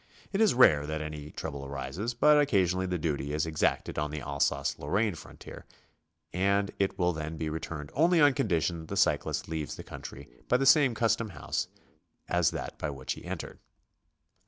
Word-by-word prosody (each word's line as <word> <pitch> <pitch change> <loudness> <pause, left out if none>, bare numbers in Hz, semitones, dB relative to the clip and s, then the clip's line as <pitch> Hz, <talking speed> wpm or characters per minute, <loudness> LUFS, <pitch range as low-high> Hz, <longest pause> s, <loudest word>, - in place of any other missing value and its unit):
It 200 - +1
is 215 - +4
rare 75 - +6
that 80 0 -2
any 75 -1 -7
trouble 70 -2 -6
arises, 70 - -4
but 150 +5 +5
occasio 95 -11 +2
nally 95 - 0
the 90 -1 -1
duty 75 -3 -2
is 75 +1 0
exacted 80 -1 0
on 75 0 -1
the 75 +1 -4
Alsace 70 0 -1
Lorraine 100 +8 0
frontier, 80 - -11 0.7
and 100 +2 +1
it 100 -1 0
will 90 -1 +2
then 80 +1 -5
be 80 -1 -2
returned 75 -2 -5
only 170 +4 +4
on 145 -2 +6
condition 85 - 0
that 80 - -10
the - - -4
cyclist - - +1
leaves 80 -2 -4
the - - -8
coun - - -9
try - - -9 0.2
by 125 - +4
the 135 - 0
same 135 -3 +6
custom 115 0 +1
house 80 -5 -3 0.6
as 85 -2 +3
that - - -6
by 80 - -2
which 65 -2 -4
he - - -11
entered. - - -6
85 Hz, 190 wpm, -29 LUFS, 75-110 Hz, 0.7 s, rare